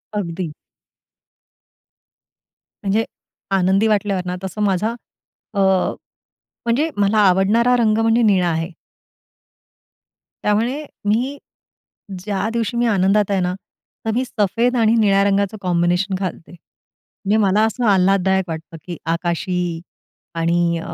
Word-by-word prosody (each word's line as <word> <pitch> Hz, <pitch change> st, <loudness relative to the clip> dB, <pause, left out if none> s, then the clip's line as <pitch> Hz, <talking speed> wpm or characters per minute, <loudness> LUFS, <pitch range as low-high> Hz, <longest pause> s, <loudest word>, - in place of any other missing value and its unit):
अगदी. 170 Hz, -4 st, -3 dB, 2.3 s
म्हणजे 205 Hz, +3 st, +1 dB, 0.5 s
आनंदी 195 Hz, +3 st, +3 dB
वाटल्यावर 200 Hz, -3 st, 0 dB
ना, 180 Hz, 0 st, -3 dB
तसं 195 Hz, +3 st, -5 dB
माझा 205 Hz, +3 st, +1 dB, 0.6 s
अ, 200 Hz, -, -2 dB, 1.1 s
म्हणजे 275 Hz, +8 st, +1 dB
मला 205 Hz, +1 st, +2 dB
आवडणारा 210 Hz, +7 st, +3 dB
रंग 215 Hz, -2 st, +3 dB
म्हणजे 225 Hz, +1 st, +3 dB
निळा 195 Hz, -5 st, +3 dB
आहे. 165 Hz, +2 st, -2 dB, 1.7 s
त्यामुळे 235 Hz, +8 st, 0 dB, 0.2 s
मी 250 Hz, +7 st, 0 dB, 0.8 s
ज्या 205 Hz, +2 st, -2 dB
दिवशी 235 Hz, +1 st, -1 dB
मी 240 Hz, -, +2 dB
आनंदात 200 Hz, 0 st, +2 dB
आहे 195 Hz, -, +2 dB
ना 180 Hz, 0 st, 0 dB, 0.5 s
तर 220 Hz, -, 0 dB
मी 255 Hz, -, 0 dB
सफेद 235 Hz, +2 st, 0 dB
आणि 225 Hz, 0 st, +3 dB
निळ्या 200 Hz, -2 st, +4 dB
रंगाचं 200 Hz, +1 st, +1 dB
कॉम्बिनेशन 180 Hz, +2 st, +1 dB
घालते. 180 Hz, -3 st, -5 dB
म्हणजे 195 Hz, +4 st, -6 dB
मला 200 Hz, +3 st, +3 dB
असं 235 Hz, +2 st, -2 dB
आल्हाददायक 190 Hz, 0 st, +3 dB
वाटतं, 165 Hz, 0 st, -7 dB
की 175 Hz, -2 st, -6 dB
आकाशी 170 Hz, 0 st, -2 dB, 0.5 s
आणि 170 Hz, 0 st, +1 dB
195 Hz, 110 wpm, -20 LUFS, 180-220 Hz, 2.3 s, निळ्या